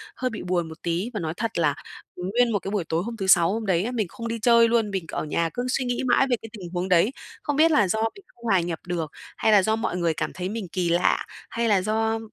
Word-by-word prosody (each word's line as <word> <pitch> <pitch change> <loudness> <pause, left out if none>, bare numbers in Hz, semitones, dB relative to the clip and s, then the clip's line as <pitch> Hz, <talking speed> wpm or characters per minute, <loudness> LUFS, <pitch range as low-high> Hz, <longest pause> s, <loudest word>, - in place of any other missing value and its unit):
hơi 255 0 -1
bị 220 - -6
buồn 175 -2 -1
một 160 - -11
tí. 175 +7 -1
Và 210 - -2
nói 160 -1 -3
thật 230 -4 -2
là, 145 -3 +2 0.4
ừm, 180 +1 -4
nguyên 245 -1 +3
một 205 - +1
cái 195 - -5
buổi 205 -5 0
tối 165 +2 0
hôm 230 0 -6
thứ 190 -2 -3
Sáu 180 0 +5
hôm 225 -1 -3
đấy 185 -1 +2
á, 245 - -2
mình 220 -6 -1
không 230 +6 -7
đi 230 0 -3
chơi 235 -1 +6
luôn, 225 -3 +1
mình 190 -4 -2
ở - - -3
nhà 165 +2 0
cứ 245 +1 -2
suy 255 0 0
nghĩ 245 +1 -1
mãi 270 +3 +4
về 245 - +3
cái 225 - -9
tình 180 -3 -8
huống 180 +1 -2
đấy, 180 +7 +4 0.3
không 290 - -1
biết 320 +2 +5
là 210 -10 +4
do 220 +4 0
mình 400 - -14
không 235 - -23
hòa 195 -5 +4
nhập 170 -1 -3
được, 165 -4 -2 0.3
hay 220 - +3
là 200 -3 +6
do 220 +2 +2
mọi 180 -5 -2
người 170 -2 +1
cảm - - -3
thấy 185 +1 -4
mình 215 -4 -4
kỳ 180 -2 0
lạ, 175 +1 +2 0.2
hay 235 0 -1
là 195 -3 +4
do 220 +2 0
205 Hz, 290 wpm, -25 LUFS, 175-230 Hz, 0.4 s, chơi